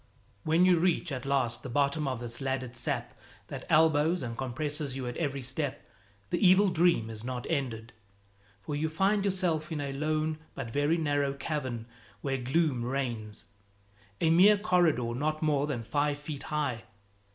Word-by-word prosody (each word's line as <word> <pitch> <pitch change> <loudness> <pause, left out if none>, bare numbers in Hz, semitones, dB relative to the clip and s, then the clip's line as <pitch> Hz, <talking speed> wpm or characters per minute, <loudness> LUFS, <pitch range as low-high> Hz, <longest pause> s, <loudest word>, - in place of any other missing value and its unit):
When 165 +3 +4
you 180 -2 +5
reach 170 -1 +1
at 130 0 -4
last 130 -4 +1
the 130 - -7
bottom 140 +3 +1
of 130 -3 -2
this 120 +2 -6
laddered 130 -2 -2
sap 120 - -2 0.4
that - - -6
elbows 160 +1 +4
and 115 -2 -4
compresses 145 +2 -3
you 135 -1 -4
at 120 0 -4
every 140 -4 -2
step, 130 +2 -4 0.4
the - - 0
evil 190 +2 +6
dream 170 -10 +2
is 110 0 -8
not 125 0 -4
ended, 120 -4 -2 0.7
for 150 - -3
you 155 +2 0
find 195 +5 +2
yourself 180 -5 0
in 155 - -2
a 140 -1 -3
lone 155 +2 -1 0.2
but 125 -4 -5
very 145 +5 +2
narrow 145 -3 0
cavern 130 -6 -3 0.4
where 135 -1 -1
gloom 130 0 +1
reigns, 120 -5 -3 0.7
a 160 - +3
mere 195 +5 +7
corridor 170 - +2
not 155 +5 -1
more 145 -2 +2
than 125 -6 -3
five 145 +4 0
feet 145 -1 -6
high. 145 -7 -1
145 Hz, 165 wpm, -30 LUFS, 130-160 Hz, 0.7 s, mere